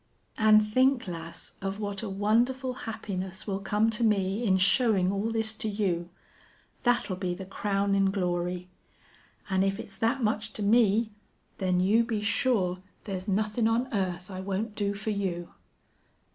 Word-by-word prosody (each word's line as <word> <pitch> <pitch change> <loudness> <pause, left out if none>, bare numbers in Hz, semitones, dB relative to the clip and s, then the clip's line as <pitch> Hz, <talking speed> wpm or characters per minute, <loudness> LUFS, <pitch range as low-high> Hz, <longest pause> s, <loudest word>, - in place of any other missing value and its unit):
An' 215 -1 +7
think, 255 +3 +2
lass, 170 -1 -7
of 195 +1 -3
what 200 -2 -3
a 220 - -4
wonderful 240 +6 +1 0.2
happiness 190 -3 -4
will 195 -2 -2
come 210 +3 +1
to 225 +2 -1
me 200 0 +1
in 190 -4 +3
showin' 195 -1 +4
all 200 +3 -1
this 225 -1 0
to 215 0 -3
you. 185 -5 -1 0.7
That'll 240 -6 +1
be 180 -1 -2
the 190 - -7
crownin' 195 0 +1
glory. 180 -2 -2 0.8
An' 190 -1 +1
if 195 0 +1
it's 195 -1 -9
that 235 +4 +1
much 215 0 0
to 210 - -4
me, 220 0 +3 0.5
then 185 -2 +1
you 210 +6 +4
be 225 -3 -2
sure 210 -5 +1 0.2
there's 190 -2 -5
nothin' 215 +3 +1
on 235 +3 0
earth 185 -2 -2
I 185 - -6
won't 200 +3 -3
do 205 -1 -1
for 215 +2 -3
you." 185 -4 -2
200 Hz, 160 wpm, -28 LUFS, 190-220 Hz, 0.8 s, An